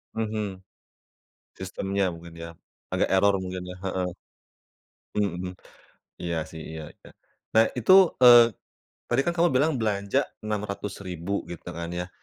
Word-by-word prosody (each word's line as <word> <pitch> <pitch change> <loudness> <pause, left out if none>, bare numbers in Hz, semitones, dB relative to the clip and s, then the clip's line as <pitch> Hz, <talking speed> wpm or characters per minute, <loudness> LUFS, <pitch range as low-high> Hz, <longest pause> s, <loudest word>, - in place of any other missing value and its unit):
Mhm. 105 -4 -3 1.0
Sistemnya 95 -1 -2
mungkin 85 0 -12
ya, 85 0 -7 0.4
agak - - +1
eror 100 +1 +4
mungkin 90 0 -5
ya, - - -13
heeh. 95 -1 -1 1.1
Mhm. 90 -2 -1 0.7
Iya 85 -1 -2
sih, 80 -1 -9
iya 80 -1 -6
iya, - - -17 0.4
nah 110 0 +6
itu, 125 +10 +4 0.3
eee, 120 -3 +9 0.5
tadi 120 +3 +2
kan 170 +4 -1
kamu 170 +1 +4
bilang 145 +5 +3
belanja 100 -3 0 0.2
Rp600.000 100 -3 -4
gitu 85 +1 -8
kan 85 0 -5
ya, 90 0 -3
100 Hz, 130 wpm, -26 LUFS, 90-110 Hz, 1.1 s, eee